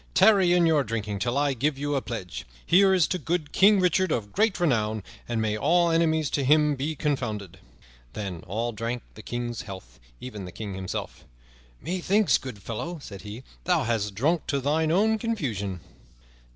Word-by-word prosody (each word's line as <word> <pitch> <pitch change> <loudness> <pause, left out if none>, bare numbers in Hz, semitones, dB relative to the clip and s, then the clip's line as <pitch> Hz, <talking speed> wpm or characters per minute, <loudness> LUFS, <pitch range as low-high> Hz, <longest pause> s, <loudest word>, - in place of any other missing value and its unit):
"Tarry 190 -2 +6
in 175 -1 +4
your 155 -3 +3
drinking 105 -3 -3
till 120 +5 -1
I 145 -1 +2
give 135 +3 0
you 145 +1 -2
a 135 - +1
pledge. 90 - -6 0.2
Here 190 +2 +5
is 185 -4 +4
to 185 - -1
good 165 -4 -2
King 200 +1 +5
Richard 185 0 +2
of 105 -6 -2
great 210 -2 +1
renown, 110 - +1 0.3
and 120 -1 -1
may 110 -1 0
all 170 +8 +3
enemies 160 -2 +2
to 140 - 0
him 150 +2 +4
be 145 +3 -3
confounded." 110 - -3 0.5
Then 95 -6 -5
all 115 +5 -2
drank 115 +2 -4
the 110 - -11
King's 120 0 -4
health, 95 -2 -10 0.2
even 105 -7 -7
the 90 - -8
King 105 -3 -6
himself. 95 -1 -5 0.6
"Methinks, 185 +3 +2
good 115 -7 -9
fellow," 125 +10 -4
said 100 -8 -9
he, 105 +4 -8 0.2
"thou 175 -4 +2
hast 110 -4 -1
drunk 155 - +1
to 140 - 0
thine 155 +4 +1
own 220 +5 +3
confusion." 110 - -3
135 Hz, 180 wpm, -26 LUFS, 110-170 Hz, 0.6 s, Tarry